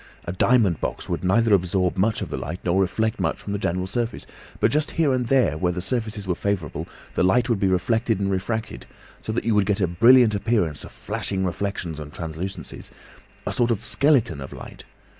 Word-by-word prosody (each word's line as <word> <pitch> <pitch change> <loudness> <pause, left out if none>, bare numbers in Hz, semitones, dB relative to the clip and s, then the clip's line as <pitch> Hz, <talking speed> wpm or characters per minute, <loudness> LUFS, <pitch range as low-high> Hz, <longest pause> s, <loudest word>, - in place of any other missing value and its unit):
A - - -3
diamond 100 -4 +3
box - - -3
would - - -3
neither 110 +4 +3
absorb 90 -1 +2
much 105 +3 +1
of - - -7
the - - -2
light 85 +5 -5
nor 90 +2 +2
reflect 110 +5 0
much - - -1
from 100 - -5
the 100 - -2
general 90 -2 -1
surface, 115 +3 -3 0.3
but - - +3
just 150 +1 +1
here 155 -5 +3
and 125 -2 0
there 120 - +2
where 90 0 +1
the 90 - -4
surfaces 110 -1 -3
were 90 - +1
favourable 95 -5 -3 0.3
the - - 0
light 120 +7 +3
would 115 -4 +1
be 95 - +2
reflected 110 +4 +1
and 100 -1 0
refracted, 95 - -3 0.3
so - - -4
that 110 - -2
you 115 - +2
would 105 -2 +2
get 105 0 +1
a 95 - +3
brilliant 115 +6 +6
appearance 100 - 0
of - - -10
flashing 95 -1 -3
reflections 90 -3 -3
and 75 -1 -8
translucencies—a 85 +4 -7
sort 120 -1 +2
of 115 -4 -1
skeleton 130 - +2
of 65 - -8
light. - - -10
100 Hz, 205 wpm, -23 LUFS, 90-115 Hz, 0.3 s, brilliant